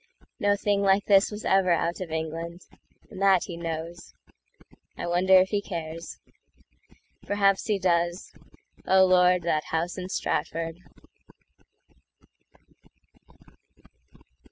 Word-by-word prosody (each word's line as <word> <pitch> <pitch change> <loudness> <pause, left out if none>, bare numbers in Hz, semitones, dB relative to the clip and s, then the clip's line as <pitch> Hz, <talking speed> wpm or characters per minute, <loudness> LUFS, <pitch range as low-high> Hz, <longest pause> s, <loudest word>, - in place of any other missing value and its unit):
No 205 0 +2
thing 200 0 0
like 195 0 +2
this 200 -1 +4
was 210 0 -8
ever 190 -1 +3
out 170 +1 0
of 180 - -5
England; 165 +2 -5 0.5
And 185 - -9
that 195 -2 +4
he 175 - -7
knows. 170 +1 -7 0.8
I - - -5
wonder 180 +2 +3
if 185 0 +5
he 205 -1 -1
cares. 165 -3 -7 1.1
Perhaps 200 0 +1
he 210 -2 +1
does.… 175 -1 -1 0.5
O 190 0 +5
Lord, 180 -1 +4
that 155 -2 -1
House 170 +3 -3
in 180 0 -6
Stratford! 165 -2 -3
180 Hz, 110 wpm, -26 LUFS, 170-195 Hz, 1.1 s, if